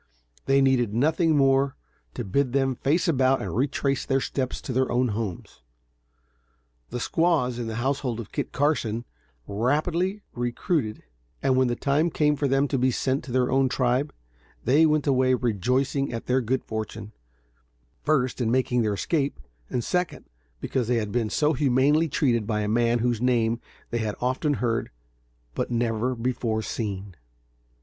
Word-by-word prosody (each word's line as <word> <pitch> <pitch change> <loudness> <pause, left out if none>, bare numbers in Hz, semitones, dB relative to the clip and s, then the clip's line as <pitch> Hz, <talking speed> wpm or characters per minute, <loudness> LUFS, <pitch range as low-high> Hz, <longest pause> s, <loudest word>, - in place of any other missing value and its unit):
They 135 0 +4
needed 120 -5 +2
nothing 160 +4 +2
more 135 0 +3 0.4
to - - -4
bid 130 +6 0
them 135 -1 +2
face 160 +7 +1
about 130 -4 +3
and 95 -3 -4
retrace 135 +2 0
their 135 0 +1
steps 130 -1 -3
to 130 - -5
their 130 +1 +1
own 125 +1 +2
homes. 105 - -5 1.3
The 125 - -4
squaws, 145 -5 +1
in 120 - -3
the 110 - -4
household 130 -1 -1
of 115 - -8
Kit - - -3
Carson, 120 -5 0 0.4
rapidly 165 - 0
recruited, 120 0 -2 0.4
and 135 -1 +3
when 130 0 +3
the 120 - 0
time 145 +6 +1
came 150 -2 +2
for 145 0 0
them 135 +1 +2
to 135 - 0
be 130 +1 +3
sent 130 +2 0
to 135 - -8
their 125 0 +1
own 135 0 +3
tribe, 130 +3 +1 0.5
they 150 +6 +5
went 150 -2 +1
away 130 -2 +3
rejoicing 125 +4 0
at 115 -1 -5
their 130 +1 +2
good 125 +2 -1
fortune; 110 -1 -5 0.9
first 130 -4 +1
in 115 - +1
making 125 0 +2
their 105 -2 0
escape, 140 - -1 0.3
and 125 - -1
second, 180 +6 -2 0.3
because 125 - -2
they 125 - +2
had 105 -2 -2
been 115 -2 0
so 150 +7 +2
humanely 145 +3 +3
treated 120 -7 +1
by 105 -2 0
a 105 - -1
man 115 +2 +2
whose 120 -2 0
name 120 -2 +1 0.3
they 120 - 0
had 110 -2 -2
often 130 +4 0
heard, 115 -3 -1 0.6
but - - -2
never 120 +1 0
before 115 -2 -1
seen. 100 -5 -4
130 Hz, 165 wpm, -25 LUFS, 115-140 Hz, 1.3 s, they